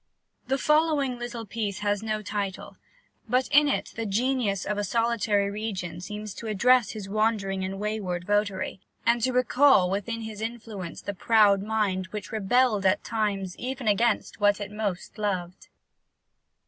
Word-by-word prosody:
The 270 - +1
following 300 -4 +2
little 240 -1 -5
piece 210 -1 -3
has 205 0 0
no 215 -1 -2
title; 200 -2 -4 0.5
but 250 +2 +2
in 295 +1 +6
it 280 - -1
the 225 -1 -3
Genius 220 -2 0
of 210 0 -1
a - - 0
solitary 210 -2 +1
region 190 -5 -4
seems 210 +2 -6
to 230 - -7
address 235 +2 +3
his 210 -3 -6
wandering 200 -2 0
and 190 +1 -3
wayward 200 -4 -3
votary, 200 -2 0 0.3
and 235 +1 +3
to 255 +3 +2
recall 250 -5 +4
within 230 +4 -2
his 220 -1 -7
influence 220 -6 -6
the 200 - -3
proud 205 -1 +4
mind 200 -3 -1
which 210 +1 -7
rebelled 220 0 +2
at 190 0 +2
times 200 -5 -2
even 255 -1 -4
against 215 +2 +1
what 205 0 +3
it 205 -1 -5
most 210 -1 -4
loved. 185 -3 -3
210 Hz, 155 wpm, -27 LUFS, 195-235 Hz, 0.5 s, in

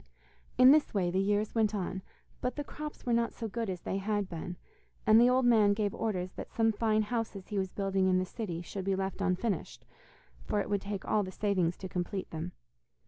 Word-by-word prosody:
In 255 +1 +9
this 300 -6 +3
way 180 -3 +1
the 185 - +1
years 205 +2 +1
went 220 -2 +2
on, 190 -1 -3 0.4
but 250 - -1
the 290 - -3
crops 300 +1 -8
were 240 - +1
not 235 0 +1
so 225 - -4
good 225 0 -3
as 180 -2 -4
they 195 - -2
had 205 0 -1
been, 175 +1 -6 0.5
and 220 0 +7
the 245 - +6
old 255 0 +3
man 215 -4 +5
gave 205 -2 0
orders 185 -5 -2
that - - -7
some 225 -1 +2
fine 215 0 +1
houses 215 -3 -3
he 205 -2 -1
was 190 -1 -2
building 195 -1 +1
in 185 -1 +4
the 185 - +1
city 180 -4 -5
should 190 +2 -5
be 195 -1 +1
left 190 0 -3
unfinished, 190 +3 -1 0.6
for 210 - 0
it 205 - -3
would 200 -1 +1
take 200 -1 -5
all 215 - +2
the 185 -2 -4
savings 185 -4 0
to 190 - -6
complete 180 +1 -3
them. 165 +2 -5
205 Hz, 220 wpm, -31 LUFS, 185-225 Hz, 0.6 s, In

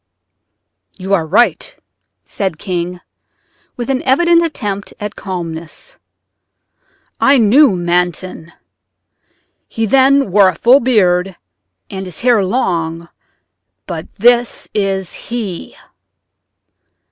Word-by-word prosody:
"You 190 +1 -3
are 165 -5 +1
right," 220 +9 +1 0.5
said 190 -6 -3
King, 180 -1 -4 0.8
with 240 - -4
an 260 - -1
evident 340 +6 +3
attempt 205 -11 -4
at 210 0 -6
calmness: 170 - -7 1.2
"I 275 0 +4
knew 235 +1 +5
Manton. 175 -1 -2 1.2
He 225 - -2
then 270 0 +3
wore 195 0 +5
a 185 - -4
full 245 +9 +5
beard 190 -7 +1 0.6
and 190 -1 -6
his 180 - -7
hair 240 -4 +3
long, 170 -6 -2 0.8
but 165 -3 -7
this 240 +2 +2
is 195 -3 -2
he." 215 -7 -6
195 Hz, 100 wpm, -15 LUFS, 180-240 Hz, 1.2 s, knew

